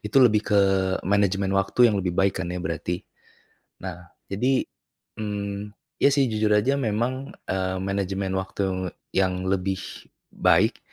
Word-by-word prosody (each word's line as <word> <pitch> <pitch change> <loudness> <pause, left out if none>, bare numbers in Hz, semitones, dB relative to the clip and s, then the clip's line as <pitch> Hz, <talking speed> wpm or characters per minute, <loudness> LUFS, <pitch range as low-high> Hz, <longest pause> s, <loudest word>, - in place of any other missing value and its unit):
itu 105 +5 -4
lebih 110 -3 +5
ke 105 - +4 0.5
manajemen 100 0 +2
waktu 100 +5 +4
yang 105 - 0
lebih 90 -2 -2
baik 95 0 +2
kan 85 - -3
ya, 90 - -3
berarti. 85 +2 -3 0.8
Nah 90 -2 -7 0.2
jadi, 130 +7 +2 0.6
mmm, 105 -1 -4 0.3
ya 140 - +6
sih 135 -3 +3
jujur 105 -1 +2
aja 135 +7 +2
memang, 125 +4 -2
eee, 95 0 -1
manajemen 95 0 -2
waktu 95 -1 -2 0.2
yang 95 -1 +1
lebih 95 0 0 0.5
baik, - - +3
100 Hz, 135 wpm, -25 LUFS, 95-105 Hz, 0.8 s, ya